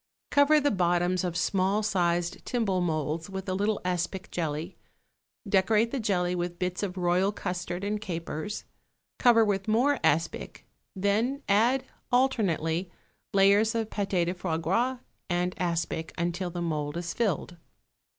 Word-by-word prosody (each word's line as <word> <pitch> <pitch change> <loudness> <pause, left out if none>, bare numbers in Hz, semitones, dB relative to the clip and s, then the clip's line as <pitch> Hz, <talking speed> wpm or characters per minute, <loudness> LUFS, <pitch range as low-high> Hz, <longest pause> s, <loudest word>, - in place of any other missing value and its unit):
= - - -66
Cover 285 +2 +5
the 290 0 +2
bottoms 175 -1 +1
of 175 -2 -2
small 195 +3 +1
sized 175 -4 0
timbale 210 -7 0
moulds 160 +1 -1
with 190 0 -6
a 185 - -1
little 205 +2 0
aspic 180 +1 -2
jelly; 160 +1 -3 0.7
decorate 210 +4 +3
the 275 - -2
jelly 180 -5 0
with 175 -1 -3
bits 180 0 -2
of 190 -2 -3
royal 180 +2 +2
custard 180 -2 -4
and 205 +1 -2
capers; 170 +1 -4 0.6
cover 230 -3 +6
with 195 -1 -1
more 255 +6 +3
aspic; 165 +3 0 0.3
then 220 +9 0
add, 235 +6 +3 0.3
alternately, 190 -10 +1 0.4
layers 200 +3 +4
of 225 -1 -1
pâté 195 -4 0
de 175 - -1
foie 175 -3 -2
gras 230 +11 0 0.3
and 180 +1 0
aspic, 170 -2 -2
until 175 +1 -1
the 175 0 -4
mould 150 -2 -2
is 175 0 -3
filled. 180 -5 -1
185 Hz, 145 wpm, -28 LUFS, 175-215 Hz, 0.7 s, cover